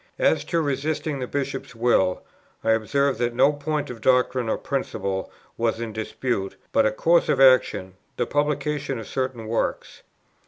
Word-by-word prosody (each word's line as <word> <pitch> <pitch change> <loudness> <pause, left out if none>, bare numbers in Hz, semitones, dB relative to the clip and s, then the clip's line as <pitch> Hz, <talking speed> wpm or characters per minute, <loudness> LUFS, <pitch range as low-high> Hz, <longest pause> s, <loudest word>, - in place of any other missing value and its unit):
As - - +2
to 170 -1 0
resisting 145 +1 -2
the 125 - -3
Bishop's 135 -2 -4
will, 115 -6 +2 0.4
I - - +3
observe 130 +4 +1
that 120 -1 0
no 140 +4 +5
point 145 -1 -3
of 115 -3 -10
doctrine 125 -1 +2
or - - +1
principle 100 -8 -3 0.3
was 115 -1 0
in 115 -2 -4
dispute, 110 -2 -3 0.2
but - - +4
a - - +1
course 165 +10 +3
of - - +2
action, 130 -8 +4 0.2
the - - +1
publication 145 -1 -1
of 115 - -6
certain 130 -4 -3
works. 115 +1 -2
130 Hz, 160 wpm, -24 LUFS, 115-145 Hz, 0.4 s, no